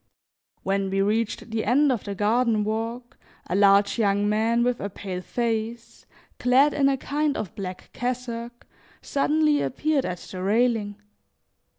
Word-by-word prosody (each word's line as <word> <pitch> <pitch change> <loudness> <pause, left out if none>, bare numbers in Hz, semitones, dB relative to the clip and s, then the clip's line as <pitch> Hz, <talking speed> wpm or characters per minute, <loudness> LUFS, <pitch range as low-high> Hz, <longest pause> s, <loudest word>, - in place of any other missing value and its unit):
When 195 0 0
we 195 +1 -1
reached 220 +2 -1
the 225 0 -1
end 275 +5 +3
of 240 - -2
the 200 -1 -4
garden 220 +2 +2
walk, 230 +3 -4 0.3
a 180 - -2
large 200 +2 +4
young 205 -1 +2
man 225 +3 +2
with 245 0 0
a 200 - -4
pale 190 -2 -6
face, 230 +2 -3 0.3
clad 265 +4 +4
in 275 -1 +3
a 270 - +1
kind 290 +2 -1
of 200 - -5
black 185 -2 -7
cassock, 240 -1 -4 0.4
suddenly 300 +1 +2
appeared 295 +1 0
at 180 0 -3
the 185 +1 -8
railing. 215 0 +1
230 Hz, 150 wpm, -25 LUFS, 205-250 Hz, 0.4 s, large